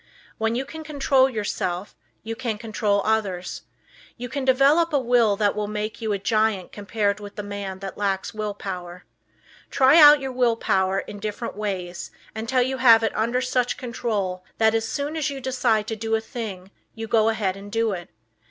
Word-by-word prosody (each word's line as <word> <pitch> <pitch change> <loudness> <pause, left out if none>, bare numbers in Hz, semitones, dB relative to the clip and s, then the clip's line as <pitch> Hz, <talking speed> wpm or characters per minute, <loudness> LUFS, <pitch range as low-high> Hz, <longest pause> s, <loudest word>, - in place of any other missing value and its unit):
When 225 +1 0
you 260 +2 -2
can 320 +2 -8
control 275 -3 +2
yourself 200 -5 -3 0.3
you 225 +1 -4
can 230 -3 -3
control 210 -2 0
others. 200 -5 -1 0.6
You 245 0 -6
can 280 +1 -3
develop 275 +6 +4
a - - +4
Will 240 -4 +3
that 205 0 +1
will 210 -1 -2
make 210 +2 -4
you 220 -1 -1
a 200 - +1
giant 215 -2 0
compared 205 0 -1
with 205 -1 -10
the 210 - -5
man 200 -2 -5
that 195 0 -7
lacks 195 -2 -1
Will 215 -1 -3
Power. 180 -3 -7 0.6
Try 270 +5 +5
out 295 0 +9
your 270 -1 -4
Will 250 -2 +2
Power 190 -3 +1
in 205 - -9
different 215 +3 -5
ways 185 -4 -4 0.3
until 230 +3 +1
you 260 +1 -2
have 230 -3 +6
it 225 - -1
under 235 +3 0
such 250 -1 0
control 215 -8 -3
that 220 0 +4
just 225 0 0
as - - -6
soon 290 +2 -3
as 310 -1 0
you 275 -1 -5
decide 250 -5 +1
to 225 - -3
do 225 +1 -1
a - - +1
thing 205 -5 -7 0.2
you 225 - -5
go 225 0 +3
ahead 205 -4 -1
and 200 +1 -10
do 225 0 +1
it. 175 -3 -6
220 Hz, 195 wpm, -24 LUFS, 200-250 Hz, 0.6 s, out